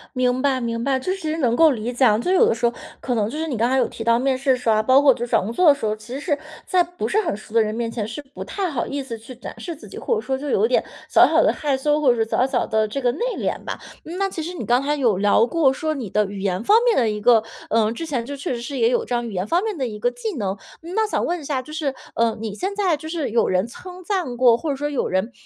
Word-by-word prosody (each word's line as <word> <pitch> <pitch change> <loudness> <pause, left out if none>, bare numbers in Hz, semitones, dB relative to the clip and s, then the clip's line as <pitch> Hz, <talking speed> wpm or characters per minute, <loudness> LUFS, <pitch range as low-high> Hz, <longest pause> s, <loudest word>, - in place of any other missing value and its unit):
明 255 0 +1
白 270 -2 +2
明 230 0 -2
白， 265 -1 +1
就 370 - -2
是 385 - -2
直 315 -3 -3
接 320 - -2
能 240 -6 +1
够 320 0 +6
理 235 0 -3
解 255 +2 +3
啊， 215 -2 +5
就 235 - -4
是 - - +4
有 - - +6
的 - - +3
时 235 - -1
候 235 - +2 0.3
可 250 -2 -2
能 210 -1 0
就 300 - -6
是 320 +1 -2
你 255 -7 -3
刚 235 +3 +2
才 265 - +2
有 245 -3 +2
提 225 - -7
到 230 0 +3
面 265 0 +1
试 270 0 +1
的 255 - +3
时 250 -2 -2
候 220 - +5
啊， 215 - +2
包 260 +4 +5
括 275 -3 +6
就 240 - -4
是 245 - -13
找 - - +4
工 210 +5 -4
作 355 +7 +3
的 285 - +6
时 250 - -5
候， 215 0 0
其 215 +3 -11
实 275 - -3
是 295 -2 -1 0.3
在 365 -2 +3
不 345 -11 -5
是 430 - +2
很 200 - -2
熟 215 +1 -13
的 230 - +5
人 215 0 -1
面 230 0 -2
前， 215 -3 -3
是 290 +6 -6
不 280 0 -9
太 385 -3 -3
好 280 - -2
意 280 0 -3
思 235 -4 -6
去 230 +3 -11
展 250 - -9
示 340 -3 -6
自 305 - -13
己， - - -10
或 470 - 0
者 440 - -2
说 265 0 -2
就 285 +1 -5
有 445 - +3
点 - - +2 0.3
小 - - +7
小 - - +3
地 - - +4
害 290 -3 -1
羞， 295 +2 +1
或 255 -4 +5
者 - - -3
是 225 - -8
小 255 - +2
小 250 -2 0
地 220 0 +1
这 275 +6 -4
个 245 -1 +2
内 - - -8 0.2
敛 - - -2
吧。 - - -5 0.3
嗯， 340 +3 -6
那 390 0 0
其 330 - -5
实 345 +3 -5
你 355 - -5
刚 245 +2 +3
才 295 +2 0
有 235 -9 +2
聊 205 +3 +4
过 290 -1 +2
说 310 +3 -2
你 245 -9 -5
的 210 +2 +2
语 200 0 -7
言 190 +1 -1
方 425 - +5
面 480 -2 +3
的 235 -4 +3
一 210 0 -3
个， 225 -1 +5 0.3
呃， 220 -1 +2
之 330 +8 -5
前 260 -7 -2
就 285 +3 -6
确 275 - -3
实 235 - -4
是 270 +3 -5
也 230 -1 +3
有 250 - 0
这 245 - -4
样 240 0 -2
语 215 - -7
言 185 +1 -2
方 350 +4 +1
面 430 -6 -3
的 260 -3 -1
一 210 -2 -7
个 245 +2 +1
技 445 -7 -5
能。 195 -2 -2 0.2
嗯， 340 +3 -8
那 440 -1 +2
想 - - -1
问 350 0 -1
一 - - -11
下， 275 -2 -2
就 305 +4 -12
是， 295 -4 -2 0.2
呃， 230 -1 +2
你 220 -2 -4
现 385 - -3
在 380 -6 +2
就 315 - -9
是 320 -6 -2
有 235 - +2
人 185 +4 +1
称 365 +9 -11
赞 345 - -2
过， 240 -2 +5
或 315 - -4
者 280 - 0
说 290 +2 -3
有 285 - -1
人 190 +6 -1
255 Hz, 365 characters per minute, -22 LUFS, 230-310 Hz, 0.3 s, 小